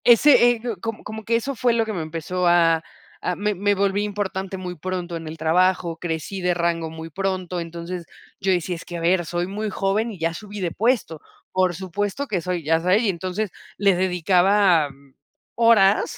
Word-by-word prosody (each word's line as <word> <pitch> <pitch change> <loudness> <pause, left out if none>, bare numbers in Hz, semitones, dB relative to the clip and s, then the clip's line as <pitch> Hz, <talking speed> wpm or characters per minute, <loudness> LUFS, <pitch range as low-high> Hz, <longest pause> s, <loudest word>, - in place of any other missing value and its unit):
Ese 245 +1 +7
ego, 235 -2 -3
como 225 -1 -5
como 220 +1 -7
que 230 +2 +1
eso 255 +4 -1
fue 240 +1 +2
lo 230 -1 +2
que 220 - -4
me 175 - -3
empezó, 165 +3 -2
a 165 -2 +4 0.4
a 180 - 0
me 210 +2 0
me 205 +2 +1
volví 200 +1 +1
importante 195 -2 -3
muy 180 -1 -5
pronto 180 0 -4
en 165 -1 -6
el 155 +1 -7
trabajo, 170 +1 +2
crecí 165 +3 -4
de 180 -1 +1
rango 170 -1 0
muy 160 0 -8
pronto, 185 0 -2
entonces, 170 +1 -6 0.3
yo 195 - +1
decía: 180 0 0
"Es 165 - -9
que, 175 - -6
a - - -5
ver, 175 +1 +2
soy 175 +1 -1
muy 210 +3 -3
joven, 200 +4 0
y 200 - -9
ya 165 0 -1
subí 205 +2 -8
de 175 -3 -1
puesto. 220 - 0 0.3
Por 185 -2 +1
supuesto 200 - -3
que 190 -7 -1
soy, 180 0 -3
ya 160 +2 +2
sabe". 180 +4 +3
Y 225 -3 +1
entonces, 185 +3 -2 0.3
les 200 -2 +3
dedicaba 180 -1 +3 0.6
horas, 230 0 +4
185 Hz, 195 wpm, -23 LUFS, 170-205 Hz, 0.6 s, Ese